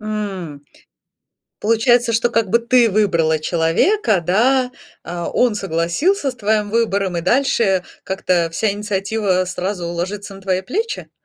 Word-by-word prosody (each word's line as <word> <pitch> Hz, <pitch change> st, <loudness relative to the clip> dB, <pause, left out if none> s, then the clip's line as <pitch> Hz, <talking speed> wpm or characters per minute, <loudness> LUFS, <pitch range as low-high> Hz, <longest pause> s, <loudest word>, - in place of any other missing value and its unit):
М. 195 Hz, -9 st, -5 dB, 1.0 s
Получается, 230 Hz, +2 st, +2 dB
что 230 Hz, +2 st, +2 dB
как 225 Hz, -5 st, +1 dB
бы 235 Hz, -, +4 dB
ты 235 Hz, 0 st, +3 dB
выбрала 170 Hz, -6 st, +2 dB
человека, 175 Hz, -, +1 dB
да, 250 Hz, +7 st, +2 dB, 0.3 s
а 175 Hz, 0 st, -5 dB
он 245 Hz, -3 st, +2 dB
согласился 205 Hz, -, 0 dB
с -, -, -13 dB
твоим 210 Hz, -2 st, 0 dB
выбором 200 Hz, -6 st, 0 dB
и -, -, -1 dB
дальше 210 Hz, -3 st, +2 dB, 0.2 s
как-то 180 Hz, -3 st, 0 dB
вся 210 Hz, +4 st, 0 dB
инициатива 200 Hz, -2 st, -1 dB
сразу 180 Hz, -1 st, -3 dB
ложится 195 Hz, +4 st, -4 dB
на 195 Hz, -, -12 dB
твои 190 Hz, -1 st, 0 dB
плечи? 440 Hz, -, -4 dB
205 Hz, 135 wpm, -19 LUFS, 180-230 Hz, 1.0 s, бы